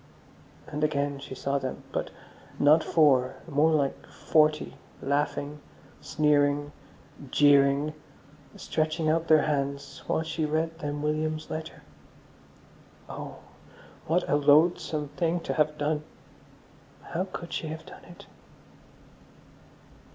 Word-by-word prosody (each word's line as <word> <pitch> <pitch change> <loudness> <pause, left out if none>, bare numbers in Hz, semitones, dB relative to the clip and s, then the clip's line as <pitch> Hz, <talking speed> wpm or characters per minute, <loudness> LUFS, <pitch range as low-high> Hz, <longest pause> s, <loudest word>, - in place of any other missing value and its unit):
And 150 +1 -4
again 145 -2 0
she 135 -1 -8
saw 140 +2 -1
them, 130 -1 -5
but - - -2 0.5
not 150 +3 +5
four, 135 -5 +3
more 155 0 +3
like 145 -4 0
forty, 155 -1 +1 0.2
laughing, 145 +1 -1 0.4
sneering, 145 -1 +1 0.6
jeering, 140 +1 +4 0.6
stretching 155 0 -1
out 165 +1 0
their 155 -2 +5
hands 140 -2 -2
while 160 - 0
she 160 0 -3
read 160 +2 -1
them 145 -1 -4
William's 155 +1 -2
letter. 160 0 -6 1.2
Oh, - - -8 0.7
what 175 +3 +1
a 145 - +3
loathsome 150 0 +3
thing 170 +2 -1
to - - -3
have 150 0 +1
done. 150 +1 -1 1.0
How 180 +3 -3
could 170 -2 -7
she 160 - -3
have 160 +1 -7
done - - -13
it! 175 - -14
150 Hz, 115 wpm, -27 LUFS, 145-160 Hz, 1.2 s, not